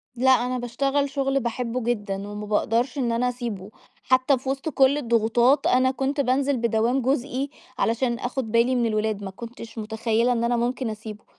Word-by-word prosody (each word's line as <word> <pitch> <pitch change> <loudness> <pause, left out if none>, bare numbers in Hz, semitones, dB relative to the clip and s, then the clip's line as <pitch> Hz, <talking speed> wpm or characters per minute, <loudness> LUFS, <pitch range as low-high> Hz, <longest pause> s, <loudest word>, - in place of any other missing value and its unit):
لأ، 260 +2 +4
أنا 250 0 -2
باشتغل 275 +4 0
شُغل 275 -1 0
باحبّه 245 0 -3
جدًا، 210 -4 -1
وما 210 0 -6
باقدرش 230 +6 0
إن 245 -4 0
أنا 240 +2 +1
أسيبُه، 230 -6 -5 0.3
حتى 260 +2 +3
في 265 +2 -6
وسط 275 +3 -2
كل 275 0 +3
الضغوطات، 235 +1 +2
أنا 260 +1 +3
كُنت 275 +2 -1
بانزل 270 +1 +1
بدوام 235 +3 +1
جزئي 265 +1 -1 0.3
علشان 235 +1 0
آخد 245 -2 -3
بالي 235 +3 +3
من 240 -1 +2
الولاد، 215 -2 -1
ما 190 - -5
كنتش 230 +2 -10
متخيلة 220 +2 0
إن 235 -1 0
أنا 240 0 +1
ممكن 245 +1 -1
أسيبُه. 215 -1 -8
245 Hz, 175 wpm, -24 LUFS, 225-265 Hz, 0.3 s, لأ